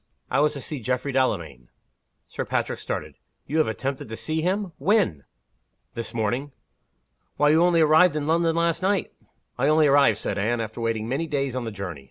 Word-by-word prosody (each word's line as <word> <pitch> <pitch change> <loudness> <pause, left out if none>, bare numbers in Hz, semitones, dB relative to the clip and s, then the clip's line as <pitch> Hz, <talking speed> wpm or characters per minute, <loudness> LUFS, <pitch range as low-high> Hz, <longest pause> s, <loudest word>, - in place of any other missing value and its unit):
"It - - +2
was 150 0 +3
to 140 - -6
see 150 0 -5
Geoffrey 125 +4 -2
Delamayn." 85 - -1 0.6
Sir - - -4
Patrick - - -2
started. - - -5 0.3
"You 155 +3 -1
have 155 - +3
attempted 130 +2 -4
to 110 - -5
see 160 +6 -2
him! 190 +2 -1
When?" 155 - +1 0.7
"This 115 - -5
morning." 120 +5 -2 0.8
"Why, 150 - +4
you 160 +2 +4
only 175 -2 +4
arrived 160 +2 +5
in 150 -1 -2
London 165 +1 +2
last 170 0 +1
night!" 195 0 0 0.5
"I 135 - +2
only 155 +1 +4
arrived," 140 -6 +5
said 100 - -3
Anne, 115 +4 0
"after 110 +1 -5
waiting 115 -1 -1
many 140 +7 -2
days 140 -4 -2
on 125 -2 -3
the 115 - -4
journey. 95 -7 -6
140 Hz, 190 wpm, -24 LUFS, 115-160 Hz, 0.8 s, arrived